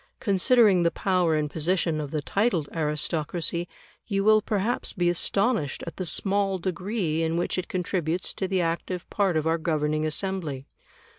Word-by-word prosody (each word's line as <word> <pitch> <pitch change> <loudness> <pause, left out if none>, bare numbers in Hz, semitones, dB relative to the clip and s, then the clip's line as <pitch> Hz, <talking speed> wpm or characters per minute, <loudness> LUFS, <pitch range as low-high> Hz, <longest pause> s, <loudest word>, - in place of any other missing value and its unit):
Considering 205 -2 +4
the 170 - +4
power 180 -3 +1
and 150 -1 -1
position 165 -1 0
of 145 - -5
the 150 0 -3
titled 195 - +1
aristocracy, 160 +2 -1 0.4
you 195 -2 0
will 215 +1 +5
perhaps 210 +4 -1
be 175 -3 +1
astonished 195 - 0
at 170 - -8
the 185 - -3
small 195 +1 +1
degree 185 -2 -2
in 165 +1 0
which 175 - -1
it 185 - -3
contributes 180 -1 -2
to 190 - -2
the 190 -1 +1
active 170 +1 -2
part 195 -5 +1
of 155 - 0
our 165 +1 +1
governing 155 -2 0
assembly. 155 -4 -2
175 Hz, 160 wpm, -26 LUFS, 160-195 Hz, 0.4 s, will